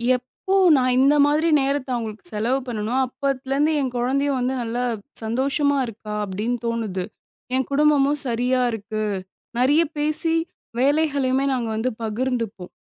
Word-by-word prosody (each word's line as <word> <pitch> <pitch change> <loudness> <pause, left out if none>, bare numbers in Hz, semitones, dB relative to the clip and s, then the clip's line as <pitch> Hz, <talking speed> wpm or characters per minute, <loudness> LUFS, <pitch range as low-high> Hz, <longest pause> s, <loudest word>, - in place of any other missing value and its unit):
எப்போ 320 +10 -3 0.2
நான் 255 -1 +2
இந்த 280 +2 +5
மாதிரி 305 +3 +2
நேரத்த 275 -1 -1
அவங்களுக்கு 220 -2 -5
செலவு 235 +6 +1
பண்ணனோ, 220 0 -3
அப்பத்துலருந்து 275 +3 0
என் 260 -2 -1
குழந்தையும் 270 +3 +1
வந்து 255 +2 0
நல்லா 240 +2 -2 0.4
சந்தோஷமா 275 +5 +1
இருக்கா 215 -2 -8
அப்டின்னு 215 +6 -2
தோணுது. 215 -6 -2 0.5
என் 265 -2 0
குடும்பமும் 290 0 +3
சரியா 250 +2 +1
இருக்கு. 215 0 -4 0.6
நிறைய 290 +6 +4 0.2
பேசி 310 +2 +1 0.4
வேலைகளையுமே 275 -2 +2
நாங்க 235 -3 -2
வந்து 255 +3 0
பகிர்ந்துப்போம். 225 -4 -2
255 Hz, 125 wpm, -23 LUFS, 230-280 Hz, 0.6 s, இந்த